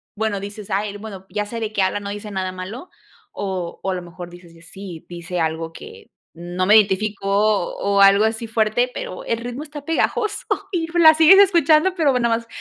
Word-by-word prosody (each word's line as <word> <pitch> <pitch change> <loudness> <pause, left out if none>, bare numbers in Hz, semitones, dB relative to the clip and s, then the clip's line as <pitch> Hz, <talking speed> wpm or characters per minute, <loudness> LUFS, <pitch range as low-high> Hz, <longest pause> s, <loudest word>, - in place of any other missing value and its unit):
bueno, 215 -2 -2
dices: 205 0 -8
"Ay, 205 +2 -1
l 205 - -8
bueno, 200 -3 -9
ya 210 0 -2
sé 230 +2 -6
de 220 -1 -3
qué 205 - -1
habla, 190 +2 0
no 200 - -6
dice 205 +1 -7
nada 190 -1 -3
malo". 190 - -8 0.4
O 185 -4 -5
o, 190 - -2
a 185 - -2
lo 180 - -4
mejor 175 0 -10
dices: 175 -1 -15
"Y 165 - -18
sí, 175 -1 -10
dice 175 0 -6
algo 160 0 -2
que 450 - -13 0.2
no 175 +2 -3
me 210 +3 +6
identifico", 205 -1 +2
o, 200 -1 +1
algo 200 +2 +6
así 225 +1 -2
fuerte, 225 +2 +1
pero 185 - -6
el 230 - -1
ritmo 245 +4 -6
está 295 -2 -10
pegajoso 415 +6 0 0.3
y, 330 -3 -1
pues, 345 +1 0
la 315 0 +9
sigues 320 +5 +7
escuchando, 340 -2 +4
pero 305 -5 +2
bueno, 245 -2 +1
nada 230 - +2
más 230 - -16
205 Hz, 220 wpm, -21 LUFS, 185-245 Hz, 0.4 s, la